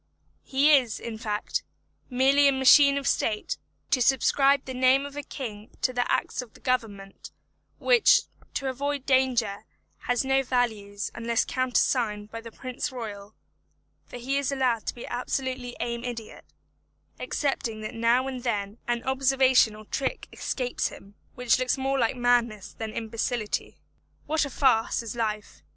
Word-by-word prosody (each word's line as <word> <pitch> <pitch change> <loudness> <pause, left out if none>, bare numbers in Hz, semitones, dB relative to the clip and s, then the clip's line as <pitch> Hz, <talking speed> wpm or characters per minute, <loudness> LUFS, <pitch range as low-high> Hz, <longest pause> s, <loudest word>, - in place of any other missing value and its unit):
He 280 +3 +3
is, 250 -5 +1
in 225 -2 -6
fact, 210 -3 -2 0.5
merely 270 +3 +4
a - - +5
machine 280 +1 +6
of 280 - -3
state, 215 -2 0 0.3
to 255 - +3
subscribe 275 +2 +3
the 260 - -5
name 260 +2 +3
of 285 0 -9
a 290 - -3
king 225 -7 -7
to 255 - +2
the 245 0 0
acts - - 0
of 245 -3 -13
the - - -15
Government, 215 -6 -3 0.5
which, - - +5 0.3
to 275 - -2
avoid 280 +1 -2
danger, 250 -6 +1 0.4
have 245 +1 +2
no 270 0 +2
value 225 -6 -1 0.2
unless 230 0 0
countersigned 235 -4 0
by 230 - -6
the 230 0 -10
Prince 255 +2 -5
Royal; 215 -4 -7 0.7
for - - -8
he 270 +3 -1
is 280 -1 -1
allowed 255 -5 0
to - - -2
be 240 - -8
absolutely 250 0 -3
an 235 0 -3
idiot, 235 -3 -7 0.7
excepting 235 -6 -2
that 215 - -5
now 235 +3 +2
and 260 -2 -5
then 210 -3 -2
an 240 -1 -1
observation 265 -4 +3
or 215 0 -12
trick 265 +5 -3
escapes 250 -2 -2
him, 200 +1 -12 0.2
which 250 0 +2
looks 255 +1 0
more 270 0 0
like 235 +1 +1
madness 240 -4 +1
than 220 -1 -5
imbecility. 225 0 -3 0.5
What 310 -1 +1
a - - -5
farce 240 -4 +2
is 230 0 -6
life. 215 - -3
245 Hz, 155 wpm, -26 LUFS, 225-265 Hz, 0.7 s, machine